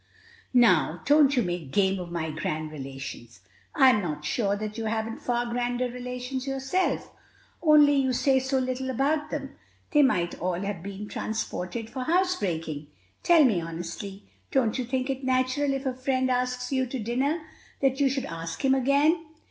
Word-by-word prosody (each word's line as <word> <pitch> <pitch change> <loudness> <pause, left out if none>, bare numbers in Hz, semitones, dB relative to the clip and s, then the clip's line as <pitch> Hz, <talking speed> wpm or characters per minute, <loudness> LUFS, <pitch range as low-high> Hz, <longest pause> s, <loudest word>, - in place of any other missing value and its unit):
"Now, 180 -8 +4
don't 290 -1 +5
you 245 - +4
make 175 -5 -4
game 190 +3 +2
of 175 -1 -6
my 160 -2 -2
grand 155 0 -3
relations. 135 -6 -8 0.3
I'm 260 -7 +6
not 150 -4 -4
sure 200 +4 0
that 215 +1 -5
you 225 0 -4
haven't 220 +1 -2
far 240 0 0
grander 245 +1 -1
relations 250 +1 -5
yourself, 270 +7 -1 0.5
only 295 -3 +6
you 265 -1 +2
say 265 +1 +3
so 265 +1 0
little 260 0 -2
about 290 +4 0
them, 275 -2 -5 0.3
they 295 - +5
might 180 -11 +1
all 180 0 -1
have 200 -4 -3
been 200 +2 -7
transported 220 0 -4
for 255 +2 -5
housebreaking. 185 - 0 0.3
Tell 335 -3 +6
me 215 -10 +3
honestly, 170 +4 -6 0.3
don't 240 -5 +1
you 255 - -1
think 255 +1 -1
it 265 0 -5
natural, 255 +2 +1
if 270 0 -3
a 260 - 0
friend 260 0 0
asks 250 0 -1
you 260 -1 +1
to 260 - -4
dinner, 260 +8 -1 0.4
that 270 0 +2
you 280 -1 +4
should 270 0 -2
ask 165 +4 -5
him 265 - +5
again?" 280 +5 +3
250 Hz, 170 wpm, -27 LUFS, 190-270 Hz, 0.5 s, I'm